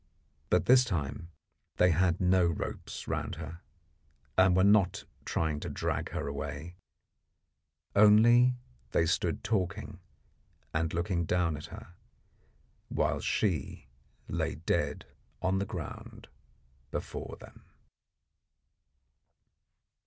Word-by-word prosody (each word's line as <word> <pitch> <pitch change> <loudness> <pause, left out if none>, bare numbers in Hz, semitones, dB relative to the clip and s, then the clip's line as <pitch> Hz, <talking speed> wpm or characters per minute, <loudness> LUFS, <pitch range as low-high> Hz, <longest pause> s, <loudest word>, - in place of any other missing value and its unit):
But 90 -1 +3
this 125 0 +7
time 85 - -3 0.5
they 90 0 +4
had 90 +1 +2
no 90 0 +4
ropes 85 - -4
round - - -2
her, 85 +3 -8 0.7
and 95 0 +5
were 95 - +4
not 95 -2 +4 0.2
trying 80 -2 -1
to - - -5
drag - - -2
her - - -4
away; 70 +4 -5 1.2
only 120 +4 +6 0.4
they 80 - +3
stood 80 - 0
talking 95 -6 -2 0.7
and 80 +1 0
looking 85 0 -1
down 90 -1 +1
at 75 - -8
her, 105 -2 -11 1.0
while - - 0
she 80 - -1 0.4
lay 80 -1 -2
dead 80 - -1 0.3
on 95 +2 +1
the 100 - -1
ground 85 -6 -7 0.6
before - - -5
them. - - -15
90 Hz, 105 wpm, -30 LUFS, 80-95 Hz, 1.2 s, this